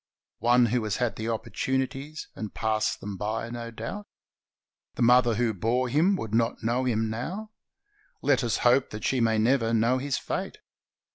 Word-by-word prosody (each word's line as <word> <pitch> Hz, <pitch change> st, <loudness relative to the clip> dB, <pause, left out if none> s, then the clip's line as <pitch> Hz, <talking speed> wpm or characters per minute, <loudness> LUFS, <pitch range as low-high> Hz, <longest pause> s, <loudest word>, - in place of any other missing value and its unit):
One 120 Hz, +1 st, +4 dB
who 120 Hz, 0 st, 0 dB
has 105 Hz, -, -1 dB
had 120 Hz, -3 st, -1 dB
opportunities 130 Hz, +5 st, -3 dB
and 110 Hz, -2 st, -5 dB
passed 110 Hz, -1 st, 0 dB
them 100 Hz, -1 st, -5 dB
by, 110 Hz, +3 st, -3 dB
no 120 Hz, -1 st, -5 dB
doubt. 115 Hz, -, -6 dB, 0.9 s
The -, -, 0 dB
mother 120 Hz, -1 st, +5 dB
who 115 Hz, 0 st, +1 dB
bore 120 Hz, +6 st, 0 dB
him 165 Hz, +10 st, +3 dB
would 110 Hz, -, -5 dB
not 115 Hz, +1 st, +1 dB
know 120 Hz, +3 st, +1 dB
him 110 Hz, -3 st, +1 dB
now. 180 Hz, -, -5 dB, 0.7 s
Let 135 Hz, -3 st, +3 dB
us 115 Hz, -, 0 dB
hope 125 Hz, +2 st, +4 dB
that 105 Hz, 0 st, -7 dB
she 130 Hz, -2 st, +1 dB
may 110 Hz, -1 st, +3 dB
never 115 Hz, 0 st, +2 dB
know 115 Hz, +3 st, +2 dB
his 140 Hz, 0 st, -1 dB
fate. -, -, -4 dB
120 Hz, 165 wpm, -27 LUFS, 110-130 Hz, 0.9 s, mother